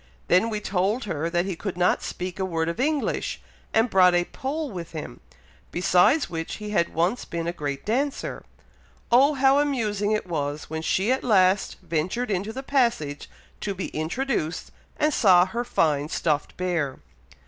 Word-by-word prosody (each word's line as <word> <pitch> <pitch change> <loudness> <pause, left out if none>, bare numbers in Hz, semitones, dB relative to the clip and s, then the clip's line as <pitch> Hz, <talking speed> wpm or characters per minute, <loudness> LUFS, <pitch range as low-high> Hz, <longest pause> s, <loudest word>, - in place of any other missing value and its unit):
Then 185 +6 +4
we 215 -1 -2
told 205 +4 0
her 165 -5 -2
that 175 +1 0
he 190 -2 -3
could 185 +1 -5
not 180 0 +2
speak 180 +1 -5
a - - 0
word 165 -3 -1
of 170 - -5
English, 295 +2 -1 0.3
and 225 +2 +3
brought 185 -4 +5
'a 175 - +3
Pole' 285 - -4
with 170 -4 -7
him; 150 - -7 0.5
besides 180 - +3
which 165 -1 -4
he 210 -1 -6
had 170 -5 0
once 175 +9 +1
been 170 -1 -4
a 170 - -2
great 145 -4 -4
dancer. 270 +6 -2 0.7
Oh! 275 +5 +5
how 270 +1 +4
amusing 215 -8 0
it 215 -2 0
was, 150 -3 -3
when 160 0 -3
she 190 +7 +1
at 260 - 0
last 190 -4 +3
ventured 180 +9 -1
into 200 +3 -1
the 265 +4 -6
passage 235 - 0 0.3
to 200 -2 -3
be 185 - -4
introduced, 165 - -2 0.3
and 300 0 +2
saw 180 -7 +6
her 235 +6 -3
fine 150 -9 +1
stuffed 150 -3 -1
bear." 170 -7 -1
185 Hz, 170 wpm, -25 LUFS, 170-235 Hz, 0.7 s, saw